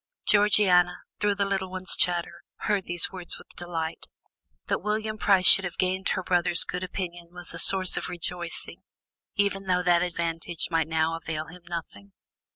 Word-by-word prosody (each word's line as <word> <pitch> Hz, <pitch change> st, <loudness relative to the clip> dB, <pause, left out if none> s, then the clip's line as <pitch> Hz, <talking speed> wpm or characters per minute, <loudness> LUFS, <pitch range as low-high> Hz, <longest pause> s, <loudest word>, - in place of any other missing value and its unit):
Georgiana, 190 Hz, -4 st, +4 dB, 0.2 s
through 205 Hz, -1 st, +1 dB
the 200 Hz, 0 st, 0 dB
little 195 Hz, -1 st, -2 dB
one's 185 Hz, 0 st, -2 dB
chatter, 175 Hz, -1 st, 0 dB, 0.2 s
heard 205 Hz, -3 st, 0 dB
these 175 Hz, 0 st, 0 dB
words 180 Hz, -2 st, -6 dB
with -, -, -16 dB
delight; 165 Hz, -2 st, -5 dB, 0.6 s
that -, -, -1 dB
William 215 Hz, +1 st, -2 dB
Price 195 Hz, -3 st, +3 dB
should 195 Hz, -, +9 dB
have 180 Hz, -2 st, -5 dB
gained 185 Hz, +1 st, 0 dB
her 190 Hz, -, -1 dB
brother's 175 Hz, -2 st, +3 dB
good 180 Hz, -, -4 dB
opinion 175 Hz, -2 st, -5 dB
was 180 Hz, 0 st, -7 dB
a -, -, -5 dB
source 190 Hz, -2 st, +3 dB
of -, -, -3 dB
rejoicing, 175 Hz, -1 st, -3 dB, 0.5 s
even 200 Hz, -1 st, 0 dB
though 180 Hz, -1 st, +1 dB
that 175 Hz, -1 st, +4 dB
advantage 170 Hz, -1 st, -2 dB
might 165 Hz, -1 st, +1 dB
now 160 Hz, 0 st, 0 dB
avail 160 Hz, -1 st, -4 dB
him 180 Hz, +2 st, -13 dB
nothing. 100 Hz, -, -7 dB
180 Hz, 165 wpm, -26 LUFS, 170-190 Hz, 0.6 s, should